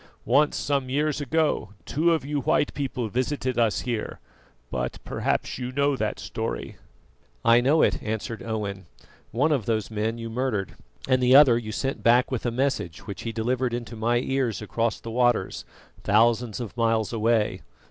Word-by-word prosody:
Once, 140 Hz, +6 st, +3 dB
some 140 Hz, -3 st, -1 dB
years 150 Hz, +2 st, 0 dB
ago, 145 Hz, -7 st, 0 dB
two 165 Hz, +4 st, +2 dB
of 160 Hz, -5 st, 0 dB
you 145 Hz, 0 st, -1 dB
white 140 Hz, -, +1 dB
people 130 Hz, -4 st, -3 dB
visited 130 Hz, +2 st, -1 dB
us 115 Hz, -3 st, +2 dB
here, 120 Hz, -3 st, -4 dB, 0.5 s
but 60 Hz, -1 st, -3 dB
perhaps -, -, -2 dB
you 125 Hz, 0 st, -4 dB
know 140 Hz, +1 st, +1 dB
that -, -, -2 dB
story." -, -, -4 dB, 0.7 s
"I 115 Hz, +1 st, +6 dB
know 145 Hz, +6 st, +4 dB
it," -, -, +1 dB
answered 110 Hz, +1 st, -4 dB
Owen; 100 Hz, -5 st, -4 dB, 0.4 s
"one 145 Hz, +7 st, +1 dB
of 135 Hz, -9 st, 0 dB
those 110 Hz, -2 st, -1 dB
men 110 Hz, +2 st, -1 dB
you 115 Hz, 0 st, -5 dB
murdered, 115 Hz, -4 st, -2 dB, 0.3 s
and 130 Hz, -1 st, +3 dB
the 125 Hz, +1 st, +5 dB
other 135 Hz, -4 st, +8 dB
you 115 Hz, -2 st, -3 dB
sent 135 Hz, +5 st, -3 dB
back 120 Hz, +3 st, +4 dB
with 125 Hz, -1 st, -2 dB
a -, -, 0 dB
message 120 Hz, -, -2 dB
which 100 Hz, -2 st, -6 dB
he 115 Hz, -, -4 dB
delivered 120 Hz, +2 st, -1 dB
into 120 Hz, -1 st, -6 dB
my 115 Hz, +2 st, +1 dB
ears 130 Hz, -2 st, -1 dB
across 115 Hz, +2 st, -1 dB
the 115 Hz, -, -7 dB
waters, 120 Hz, 0 st, +1 dB, 0.4 s
thousands 115 Hz, +1 st, +2 dB
of 115 Hz, -3 st, -6 dB
miles 115 Hz, -2 st, +1 dB
away." 115 Hz, -1 st, +1 dB
120 Hz, 170 wpm, -25 LUFS, 110-130 Hz, 0.7 s, other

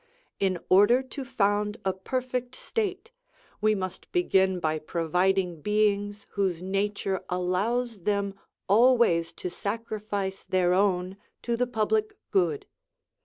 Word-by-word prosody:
In 190 Hz, -2 st, +1 dB
order 205 Hz, +7 st, +5 dB
to 270 Hz, +1 st, -7 dB
found 210 Hz, -4 st, 0 dB
a 190 Hz, -, +2 dB
perfect 250 Hz, +5 st, -3 dB
state, 415 Hz, -, -3 dB, 0.5 s
we 215 Hz, 0 st, +3 dB
must 185 Hz, -2 st, -6 dB
begin 190 Hz, -, +2 dB
by 155 Hz, -2 st, 0 dB
providing 175 Hz, +2 st, 0 dB
beings 205 Hz, +1 st, 0 dB
whose 190 Hz, -4 st, 0 dB
nature 195 Hz, +1 st, -1 dB
allows 200 Hz, +6 st, 0 dB
them 200 Hz, +1 st, 0 dB, 0.3 s
always 210 Hz, -6 st, +4 dB
to 180 Hz, -, -6 dB
sacrifice 205 Hz, -1 st, -4 dB
their 180 Hz, -1 st, +2 dB
own 185 Hz, -1 st, +1 dB, 0.3 s
to 235 Hz, 0 st, 0 dB
the 250 Hz, +1 st, 0 dB
public 420 Hz, -, 0 dB
good. 175 Hz, -7 st, +1 dB
200 Hz, 120 wpm, -27 LUFS, 185-235 Hz, 0.5 s, order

